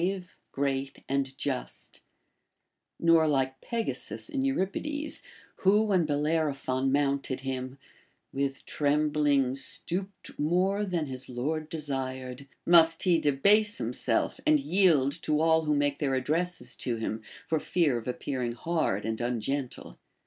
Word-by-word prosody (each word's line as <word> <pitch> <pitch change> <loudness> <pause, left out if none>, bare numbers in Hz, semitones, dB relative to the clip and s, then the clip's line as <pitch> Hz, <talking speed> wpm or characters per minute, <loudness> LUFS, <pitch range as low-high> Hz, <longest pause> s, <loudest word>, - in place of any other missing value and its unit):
BASHFULNESS 185 +1 0
63 180 - -26
great, 135 -1 -2
and 135 -1 -1
just; - - -5 1.0
nor 165 -1 +5
like 135 -2 0
Pegasus 230 +6 -3
in 275 -4 -1
Euripides, 285 +5 -2 0.4
who, 205 +3 +4
when 190 -7 +2
Bellerophon 145 -3 0
mounted 140 -2 0
him, 130 0 -4 0.6
With 135 0 -2
trembling 145 -2 +2
stooped 185 +7 -5
more 185 +7 +1
than 175 -4 -1
his 130 -1 -7
lord 150 +6 -3
desired,* 135 -3 -4 0.2
must 165 -1 +5
he 175 -3 +4
debase 205 +10 +4
himself - - 0
and 310 -1 +4
yield 175 - +3
to 150 -1 +1
all 160 0 +3
who 150 -1 +2
make 145 0 +1
their 135 -3 +1
addresses 150 -1 -1
to 120 - -2
him, 110 -1 -3 0.2
for 160 - 0
fear 155 -8 +1
of 115 - -11
appearing 125 -1 -2
hard 155 - -1
and 110 +1 -2
ungentle. 125 +3 -3
145 Hz, 130 wpm, -29 LUFS, 135-175 Hz, 1.0 s, nor